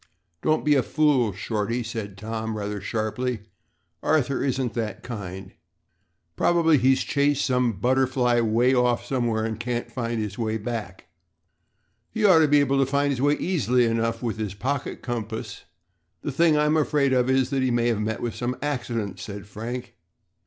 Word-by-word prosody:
"Don't 155 0 +1
be 150 - +5
a 135 - +4
fool, 140 -6 +2
Shorty," 110 +4 -2
said 110 -4 -6
Tom, 110 +1 -4
rather 105 -1 -4
sharply. 110 +3 -2 0.6
"Arthur 140 -4 +1
isn't 130 -3 -1
that 110 -3 -4
kind. 95 -5 -7 0.8
Probably 165 - +3
he's 130 +2 +3
chased 145 0 +1
some 125 -3 +1
butterfly 125 +2 +2
way 115 +3 +3
off 125 -1 +2
somewhere 120 -4 0
and 110 -1 -4
can't 120 +1 -3
find 115 -2 -2
his 105 -1 -4
way 110 -1 -1
back." 105 -5 -5 1.0
"He 220 -1 -1
ought 185 -5 +7
to 155 - +5
be 145 0 +5
able 140 -1 +2
to 135 - +4
find 140 0 +2
his 130 -2 -2
way 145 +1 +3
easily 125 -10 +1
enough 115 +1 -1
with 115 -2 -2
his 105 -3 -3
pocket 130 +7 -3
compass. 110 -2 -5 0.6
The 145 - -2
thing 160 +2 +3
I'm 150 +1 +3
afraid 145 -3 +2
of 125 0 +2
is 130 -1 +2
that 135 -1 +1
he 130 - +2
may 120 -1 +1
have 110 -3 0
met 110 +1 -2
with 120 -2 -2
some 125 +1 -3
accident," 120 -8 -3
said 100 -1 -7
Frank. 115 +5 -7
120 Hz, 170 wpm, -25 LUFS, 110-135 Hz, 1.0 s, ought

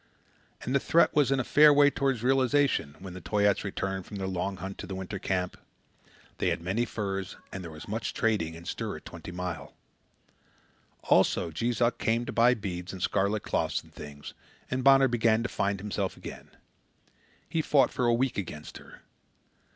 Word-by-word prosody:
And 130 - -2
the 140 - +4
threat 170 +5 +3
was 145 -3 +4
in 135 - +2
a - - +1
fair 150 +3 +7
way 145 0 +6
toward 135 -5 0
realization, 130 - +2
when 95 -1 -9
the 95 - -8
Toyaats 100 +1 +2
returned 95 -2 -3
from 105 - -7
their 95 - -3
long 95 +1 -2
hunt 95 +2 -7
to 100 - -6
the 95 - -5
winter 95 +1 -5
camp. 90 -1 -2 0.8
They - - +2
had - - -1
many 95 +8 -1
furs, 95 -4 -4 0.2
and 95 - -5
there 85 - -7
was 75 -1 -10
much 110 +3 -3
trading 100 -8 0
and 85 +1 -11
stir - - -3
at - - -15
Twenty - - -9
Mile. 90 -4 -5 1.3
Also, 85 - +3
Jees 115 +9 -2
Uck 120 0 +2
came 115 +2 +1
to - - -4
buy 120 +2 +5
beads 90 -4 -5
and 95 -2 -6
scarlet 100 +2 +1
cloths - - -1
and - - -20
things, 75 -1 -9 0.4
and 130 0 -1
Bonner 135 0 +7
began 115 -2 +2
to 120 - -2
find 100 0 -1
himself 100 -1 -3
again. - - -9 1.0
He 165 - 0
fought 140 -4 +3
for 125 - -1
a 120 - +4
week 125 -2 0
against 75 -5 -7
her. - - -15
105 Hz, 190 wpm, -28 LUFS, 95-125 Hz, 1.3 s, fair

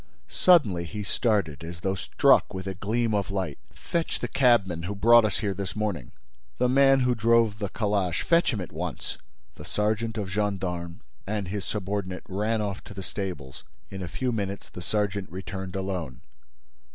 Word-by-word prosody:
Suddenly, 110 - +4
he 105 +5 -5
started, 100 - 0
as 85 +1 -7
though 95 0 0
struck 95 - +3
with 95 0 -5
a 95 - -3
gleam 110 +4 0
of 100 -2 0
light: 95 -7 -3
"Fetch 170 -1 -2
the - - -2
cabman 115 -11 +3
who 100 +3 -3
brought 115 +3 +6
us 105 - 0
here 100 -2 -1
this 95 0 -5
morning! 105 -4 -2 0.5
The 125 - +3
man 135 +1 +5
who 125 0 +3
drove 115 -2 +3
the 100 -3 -2
calash! 100 -6 0
Fetch 170 -2 +3
him 110 -6 -2
at 90 - -7
once!" 85 +1 -5 0.4
The - - -9
sergeant 110 +2 -1
of 100 -3 -3
gendarmes 90 -4 -2 0.3
and 100 -3 -2
his 100 0 -3
subordinate 100 -2 -3
ran 105 +3 0
off 100 -1 -4
to 100 - -10
the 95 - -5
stables. 90 - -5 0.3
In 95 - -6
a 90 - -4
few 125 +9 -2
minutes, 100 -3 -4
the 90 - -8
sergeant 100 0 -1
returned 95 0 -6
alone. 95 -9 -3
100 Hz, 175 wpm, -27 LUFS, 95-110 Hz, 0.5 s, brought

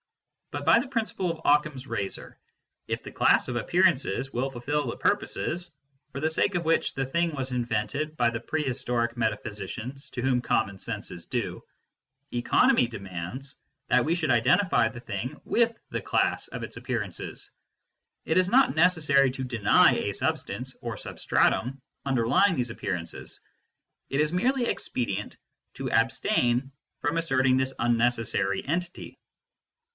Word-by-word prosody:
But - - -5
by 225 - +6
the 260 - -3
prin 230 -4 0
ciple 185 -4 -3
of 165 - -7
Occam 150 +1 +4
s 130 0 -8
razor, 100 -7 -4 0.5
if - - -3
the - - -8
class - - +3
of 125 - -3
appearances 135 - +1
will 130 +3 0
fulfil 140 +4 -2
the - - -4
purposes 175 +1 -1 0.4
for 140 - -5
the 155 +2 +1
sake 180 +4 +1
of 170 -1 -1
which 165 +1 +2
the 135 - -1
thing 170 +5 0
was 135 -1 -2
invented 125 +6 -2
by 120 -1 +3
the 115 - -3
prehistoric 120 -4 -1
metaphysicians 110 +3 -4
to 125 - -5
whom 130 -2 +2
common 100 -5 0
sense - - -5
is - - -9
due, - - -3 0.7
economy 125 - +3
demands 100 +5 -6 0.3
that 125 - +4
we 165 +5 +1
should 160 -6 0
identify 125 - +3
the 115 - -9
thing 120 +5 -5
with 230 -1 +1
the - - -2
class - - +1
of - - -6
its - - -7
appearances. - - -4 0.7
It - - +1
is 185 0 +4
not 255 -1 +4
necessary 155 -5 +4
to 130 0 -5
deny 115 -5 +4
a - - -1
substance - - -3
or - - -4
substratum 135 +3 0 0.3
underly 135 - +4
ing 175 - 0
these 125 -3 -1
appearances; 85 -6 -4 0.7
it 135 - -1
is 150 +2 +2
merely 245 +7 +2
expedient 105 - -3 0.4
to - - -4
abstain 125 +3 +2 0.3
from 145 +3 -1
asserting 135 -5 +3
this 130 0 0
unnecessary 115 -4 +1
entity. 170 +3 -3
135 Hz, 150 wpm, -27 LUFS, 120-165 Hz, 0.7 s, by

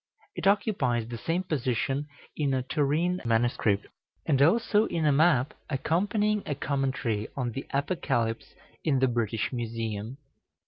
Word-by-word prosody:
It - - -1
occupies 145 - +2
the 120 0 -5
same 170 +7 -1
position 135 - -1 0.3
in 140 -3 +1
a 130 - 0
Turin 155 +7 0
MS., 120 +1 +2 0.7
and 140 -3 +2
also 215 +6 +4
in 165 -2 -1
a 150 - +5
map 145 -3 +3 0.2
accompanying 205 +9 +1
a 145 - -1
commentary 135 -6 -1
on 125 -3 -1
the 135 - -6
Apocalypse 135 -6 -1 0.3
in 145 -4 +2
the 130 0 +3
British 115 0 -1
Museum. 115 0 -4
135 Hz, 135 wpm, -28 LUFS, 120-165 Hz, 0.7 s, a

